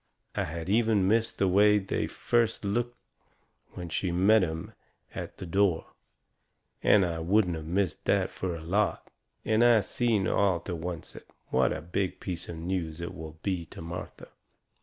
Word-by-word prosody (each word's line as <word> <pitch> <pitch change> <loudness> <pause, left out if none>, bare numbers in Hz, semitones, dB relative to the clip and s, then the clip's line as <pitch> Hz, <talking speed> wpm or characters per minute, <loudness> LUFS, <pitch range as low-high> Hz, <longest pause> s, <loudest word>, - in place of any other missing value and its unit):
I - - -1
had 80 +2 -5
even 110 -2 +3
missed 115 +2 +1
the 100 - +2
way 105 +3 +5
they 95 -2 -1
first 115 -3 0
looked 120 +4 -1 0.8
when 90 -1 -6
she 90 +2 -1
met 100 +4 +5
'em 85 +6 -4 0.4
at - - -6
the - - -6
door, 90 -1 +1 0.9
and 100 -3 +5
I 85 -2 -2
wouldn't 90 +1 +2
of 80 -1 -7
missed 90 0 -1
that - - +2
fur 90 -2 -3
a 80 - -8
lot. 100 +5 0 0.3
And 110 +2 +3
I 120 -2 +6
seen 110 -1 +1
all 95 -4 +2
to 90 - -5 0.2
oncet 85 -3 -9 0.2
what - - +3
a - - -4
big 90 +2 -2
piece 90 -3 -5
of 85 - -5
news 85 -1 -3
it 85 - -5
will 80 0 -9
be 90 -4 -2
to - - -10
Martha. 85 +2 -7
95 Hz, 170 wpm, -29 LUFS, 85-105 Hz, 0.9 s, I